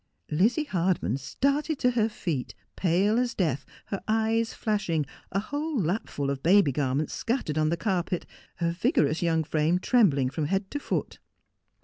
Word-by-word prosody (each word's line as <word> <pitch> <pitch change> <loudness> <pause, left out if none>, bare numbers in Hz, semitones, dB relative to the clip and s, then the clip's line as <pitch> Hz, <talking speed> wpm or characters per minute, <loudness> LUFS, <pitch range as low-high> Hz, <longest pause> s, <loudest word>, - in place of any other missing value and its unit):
301 155 +4 +1
Lizzie 250 +8 +3
Hardman 170 - +1
started 280 - 0
to 250 - +2
her 225 -2 +1
feet, 165 - -4 0.2
pale 195 +6 +2
as 245 -2 -1
death, 155 -8 0 0.2
her 195 - -4
eyes 225 +1 +1
flashing, 195 -8 -1 0.3
a - - -1
whole 290 +5 -2
lapful 165 -6 -1
of 135 -1 -4
baby 175 -1 +5
garments 140 +2 -1
scattered 230 - -1
on 155 0 +2
the 170 - 0
carpet, 180 -1 -1 0.3
her 170 0 0
vigorous 170 - +1
young 165 -2 +2
frame 155 +3 +1
trembling 175 - +3
from 150 +2 -2
head 195 +4 -1
to 290 - -2
foot. - - -3
185 Hz, 160 wpm, -27 LUFS, 155-225 Hz, 0.3 s, baby